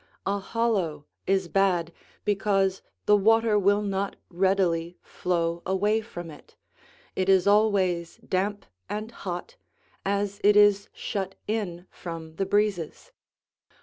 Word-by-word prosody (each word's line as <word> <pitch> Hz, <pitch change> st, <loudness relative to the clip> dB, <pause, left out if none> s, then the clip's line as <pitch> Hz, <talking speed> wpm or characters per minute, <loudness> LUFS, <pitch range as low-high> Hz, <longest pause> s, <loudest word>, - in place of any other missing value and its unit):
A 200 Hz, +1 st, 0 dB
hollow 195 Hz, -9 st, -1 dB, 0.2 s
is 190 Hz, -1 st, +2 dB
bad, 175 Hz, -3 st, +1 dB, 0.3 s
because 195 Hz, -2 st, +1 dB, 0.2 s
the 210 Hz, -, +6 dB
water 220 Hz, +1 st, +4 dB
will 205 Hz, +1 st, +3 dB
not 195 Hz, 0 st, -2 dB, 0.2 s
readily 180 Hz, -2 st, +1 dB
flow 170 Hz, -1 st, -1 dB
away 205 Hz, +4 st, +1 dB
from 175 Hz, -6 st, -8 dB
it; 150 Hz, -, -16 dB, 0.6 s
it 185 Hz, 0 st, 0 dB
is 190 Hz, -2 st, +5 dB
always 195 Hz, -5 st, +2 dB
damp 200 Hz, +2 st, -1 dB, 0.2 s
and 215 Hz, +2 st, -4 dB
hot, 190 Hz, -, -6 dB, 0.5 s
as 200 Hz, 0 st, -1 dB
it 205 Hz, 0 st, +6 dB
is 205 Hz, -1 st, +5 dB
shut 195 Hz, -2 st, -4 dB
in 190 Hz, -5 st, -3 dB
from 165 Hz, -2 st, -8 dB
the 195 Hz, -, -1 dB
breezes. 205 Hz, -, -1 dB
195 Hz, 120 wpm, -26 LUFS, 175-205 Hz, 0.6 s, the